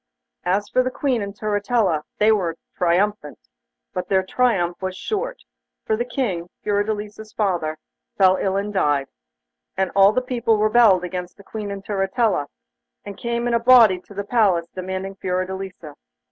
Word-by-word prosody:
As 195 Hz, +3 st, +1 dB
for 255 Hz, -, +2 dB
the 255 Hz, -, 0 dB
Queen 255 Hz, -3 st, -1 dB
and 200 Hz, 0 st, -4 dB
Turritella, 205 Hz, -5 st, 0 dB, 0.2 s
they 215 Hz, +1 st, +4 dB
were 175 Hz, -6 st, 0 dB, 0.2 s
triumphant; 190 Hz, +4 st, 0 dB, 0.6 s
but 180 Hz, -1 st, -4 dB
their 190 Hz, -1 st, +3 dB
triumph 190 Hz, -5 st, 0 dB
was 185 Hz, 0 st, -4 dB
short, -, -, -3 dB, 0.4 s
for 220 Hz, -, +1 dB
the 235 Hz, -, -1 dB
King, 205 Hz, -9 st, -2 dB
Fiordelisa's 210 Hz, +1 st, -2 dB
father, 175 Hz, -7 st, -1 dB, 0.4 s
fell 190 Hz, -1 st, +5 dB
ill 190 Hz, 0 st, 0 dB
and 205 Hz, +1 st, -3 dB
died, 145 Hz, -7 st, +1 dB, 0.7 s
and 190 Hz, -1 st, 0 dB
all 195 Hz, +1 st, +7 dB
the 255 Hz, +4 st, 0 dB
people 235 Hz, -3 st, +1 dB
rebelled 215 Hz, -3 st, +5 dB
against 180 Hz, 0 st, -5 dB
the 200 Hz, -, -15 dB
Queen 210 Hz, 0 st, -6 dB
and 200 Hz, 0 st, -6 dB
Turritella, 195 Hz, -, 0 dB, 0.6 s
and 200 Hz, -, -7 dB
came 235 Hz, +3 st, -2 dB
in 240 Hz, -, 0 dB
a 235 Hz, -, +3 dB
body 230 Hz, -6 st, +6 dB
to 200 Hz, +2 st, -16 dB
the 200 Hz, -, -3 dB
palace 200 Hz, -7 st, +2 dB
demanding 190 Hz, +1 st, -5 dB
Fiordelisa. 185 Hz, -3 st, -4 dB
200 Hz, 160 wpm, -22 LUFS, 185-220 Hz, 0.7 s, all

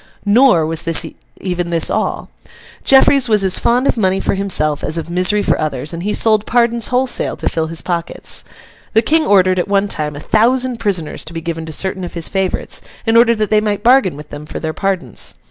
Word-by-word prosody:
Nor 205 Hz, -5 st, +4 dB
was 160 Hz, 0 st, -3 dB, 0.6 s
even 180 Hz, -2 st, -3 dB
this 165 Hz, -2 st, +1 dB
all. -, -, -2 dB, 0.5 s
Jeffreys 270 Hz, -1 st, +4 dB
was 210 Hz, -2 st, +3 dB
as 185 Hz, -1 st, +2 dB
fond 245 Hz, +3 st, +1 dB
of 260 Hz, -, +1 dB
money 190 Hz, -3 st, +1 dB
for -, -, -1 dB
himself 175 Hz, -7 st, -1 dB
as 155 Hz, -, -2 dB
of 165 Hz, +1 st, -5 dB
misery 185 Hz, +4 st, +1 dB
for -, -, 0 dB
others, 150 Hz, 0 st, -3 dB
and 170 Hz, -, -5 dB
he 205 Hz, +4 st, -2 dB
sold 215 Hz, -1 st, +1 dB
pardons 235 Hz, -1 st, +1 dB
wholesale 255 Hz, +1 st, +2 dB
to -, -, -4 dB
fill 160 Hz, -1 st, -1 dB
his 165 Hz, 0 st, -5 dB
pockets. 170 Hz, -1 st, -2 dB, 0.5 s
The 225 Hz, +1 st, +3 dB
King 315 Hz, +5 st, +2 dB
ordered, 185 Hz, -2 st, +3 dB
at 180 Hz, -, -1 dB
one 200 Hz, 0 st, +1 dB
time, 150 Hz, -6 st, -3 dB
a -, -, -7 dB
thousand 245 Hz, -, +1 dB
prisoners 195 Hz, -8 st, -3 dB
to 160 Hz, -, -8 dB
be 165 Hz, -, -4 dB
given 165 Hz, -1 st, -5 dB
to -, -, -6 dB
certain 190 Hz, +3 st, -3 dB
of 175 Hz, -, -7 dB
his 170 Hz, -1 st, -1 dB
favourites, 190 Hz, -2 st, -2 dB, 0.2 s
in 225 Hz, 0 st, +1 dB
order 235 Hz, 0 st, +5 dB
that 215 Hz, -1 st, -2 dB
they 215 Hz, 0 st, +4 dB
might 210 Hz, -1 st, -2 dB
bargain 240 Hz, -, +3 dB
with 150 Hz, 0 st, -11 dB
them 145 Hz, +1 st, -9 dB
for -, -, -6 dB
their 160 Hz, -1 st, -4 dB
pardons. 185 Hz, -, -2 dB
190 Hz, 215 wpm, -16 LUFS, 165-225 Hz, 0.6 s, order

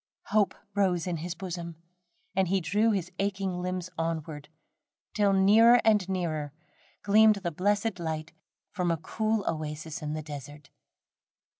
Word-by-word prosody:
Hope 205 Hz, -1 st, +2 dB, 0.2 s
rose 185 Hz, -5 st, +1 dB
in 175 Hz, -2 st, -2 dB
his 170 Hz, +3 st, -5 dB
bosom, 170 Hz, -2 st, -6 dB, 0.6 s
and 190 Hz, -1 st, +2 dB
he 195 Hz, +2 st, +2 dB
drew 205 Hz, +7 st, +1 dB
his 190 Hz, -5 st, -1 dB
aching 195 Hz, -2 st, -1 dB
limbs 180 Hz, 0 st, -3 dB
onward, 160 Hz, -2 st, -3 dB, 0.6 s
till 205 Hz, -2 st, +3 dB
nearer 215 Hz, +5 st, +6 dB
and 210 Hz, -4 st, +3 dB
nearer 155 Hz, -6 st, -2 dB, 0.5 s
gleamed 215 Hz, +1 st, +6 dB
the 190 Hz, -4 st, -3 dB
blessed 205 Hz, +3 st, 0 dB
light 160 Hz, -1 st, -4 dB, 0.4 s
from 180 Hz, -3 st, -1 dB
a 165 Hz, -, +1 dB
cool 215 Hz, +5 st, -1 dB
oasis 155 Hz, 0 st, -4 dB
in 150 Hz, 0 st, -3 dB
the 155 Hz, 0 st, -4 dB
desert. 145 Hz, 0 st, -9 dB
180 Hz, 140 wpm, -28 LUFS, 160-200 Hz, 0.6 s, nearer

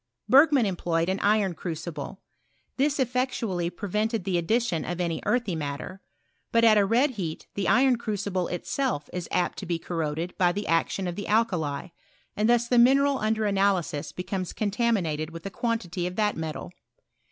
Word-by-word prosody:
Berg 275 Hz, +7 st, +7 dB
man 265 Hz, -6 st, +4 dB
employed 175 Hz, -3 st, 0 dB
an 190 Hz, +1 st, 0 dB
iron 205 Hz, -3 st, +2 dB
crucible. 165 Hz, 0 st, -6 dB, 0.6 s
This 280 Hz, +1 st, +1 dB
effectually 245 Hz, -8 st, -1 dB
prevented 210 Hz, +3 st, -2 dB
the 180 Hz, -2 st, 0 dB
addition 220 Hz, -1 st, 0 dB
of 175 Hz, 0 st, -4 dB
any 170 Hz, -2 st, -1 dB
earthy 240 Hz, -8 st, +1 dB
matter. 155 Hz, +5 st, -5 dB, 0.5 s
But 230 Hz, 0 st, +3 dB
at 225 Hz, -2 st, +7 dB
a 205 Hz, -2 st, +4 dB
red 250 Hz, +7 st, +3 dB
heat 175 Hz, -9 st, -5 dB
the 200 Hz, -, -2 dB
iron 255 Hz, 0 st, +4 dB
crucible 200 Hz, -5 st, -2 dB
itself 180 Hz, -, -2 dB
is 180 Hz, -2 st, -4 dB
apt 180 Hz, -, 0 dB
to 190 Hz, -, -7 dB
be 170 Hz, -1 st, 0 dB
corroded 165 Hz, 0 st, -3 dB
by 175 Hz, -1 st, +4 dB
the 205 Hz, +2 st, -3 dB
action 165 Hz, +3 st, 0 dB
of 175 Hz, -, -3 dB
the 205 Hz, -, -5 dB
alkali, 180 Hz, -9 st, 0 dB, 0.5 s
and 215 Hz, +2 st, +1 dB
thus 240 Hz, 0 st, +3 dB
the 245 Hz, 0 st, +4 dB
mineral 275 Hz, +3 st, +5 dB
under 215 Hz, 0 st, 0 dB
analysis 195 Hz, -6 st, 0 dB
becomes 185 Hz, 0 st, -4 dB
contaminated 200 Hz, -8 st, 0 dB
with 165 Hz, +1 st, -10 dB
a 195 Hz, -, -4 dB
quantity 195 Hz, -7 st, -2 dB
of 180 Hz, -, -6 dB
that 210 Hz, 0 st, +1 dB
metal. 155 Hz, -, -5 dB
195 Hz, 170 wpm, -26 LUFS, 170-230 Hz, 0.6 s, Berg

